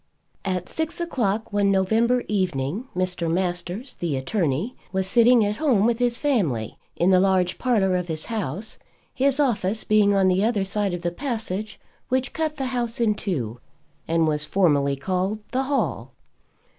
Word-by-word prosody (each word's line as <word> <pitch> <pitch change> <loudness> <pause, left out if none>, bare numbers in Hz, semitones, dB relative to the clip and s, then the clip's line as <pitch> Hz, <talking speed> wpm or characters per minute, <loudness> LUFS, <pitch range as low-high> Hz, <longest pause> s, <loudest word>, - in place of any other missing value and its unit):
At 185 -2 -2
six 320 +1 -2
o'clock 225 - -1
one 200 -1 +3
November 225 +6 +2
evening, 185 - -1
Mr. 180 -2 -1
Masters, 180 +7 -2
the 160 -6 -2
attorney, 165 - -1 0.2
was 190 0 0
sitting 235 +2 +5
at 205 +1 -2
home 255 -10 +3
with 235 0 +1
his 240 -1 +1
family 175 - -1 0.2
in 175 +3 +3
the 185 - +6
large 185 -1 +2
parlour 205 -7 +2
of 180 -1 -1
his 160 -2 -4
house, 210 - -4 0.3
his 275 +1 +2
office 220 -6 +1
being 210 -1 +3
on 195 -1 +4
the 185 +2 +2
other 220 -3 +1
side 195 -1 -1
of 175 - -8
the 175 - 0
passage 215 -3 -4 0.3
which 260 +1 0
cut 315 -1 -1
the 270 - -2
house 235 -2 -2
in 225 -3 +3
two 125 - -3 0.5
and 165 0 +2
was 150 -1 0
formally 145 -5 +2
called 185 +7 -1
the 265 +1 0
hall. 280 0 -2
200 Hz, 165 wpm, -24 LUFS, 180-235 Hz, 0.5 s, the